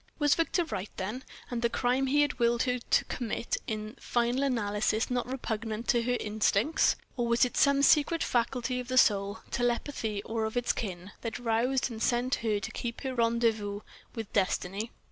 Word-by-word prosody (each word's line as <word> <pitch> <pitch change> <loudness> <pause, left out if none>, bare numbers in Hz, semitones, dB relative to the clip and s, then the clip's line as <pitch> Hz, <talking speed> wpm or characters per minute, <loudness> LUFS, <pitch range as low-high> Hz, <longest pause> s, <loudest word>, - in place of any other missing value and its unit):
Was 295 -2 +4
Victor 335 +2 +1
right, 205 -10 -4
then, 215 +8 -4 0.3
and 240 -1 -2
the 235 - +2
crime 255 +3 +1
he 290 +2 +4
had 290 -3 -2
willed 235 0 +3
her 250 -1 0
to - - +1
commit 235 -1 -3
in 215 +1 -4
final 240 +2 0
analysis 220 -3 0
not 245 -1 0
repugnant 225 -3 -3
to 240 - +4
her 245 +1 0
instincts? 215 +6 +2 0.2
Or 240 -3 -1
was 235 +2 +4
it 250 - -5
some 280 0 +4
secret 305 +4 +4
faculty 250 +1 0
of 250 - -6
the 255 0 -1
soul, 200 -2 +3
telepathy 235 -3 -1
or 225 -1 -2
of 220 +2 -3
its 245 0 +1
kin, 190 -3 -5
that 230 - -4
roused 245 +2 0
and 220 -1 -7
sent 245 +2 +1
her 215 -3 +1
to 220 - -5
keep 235 +1 -5
her 265 -2 -3
rendezvous 230 -4 +1 0.3
with 225 -3 -6
destiny? 195 +2 0
235 Hz, 185 wpm, -29 LUFS, 220-255 Hz, 0.3 s, Was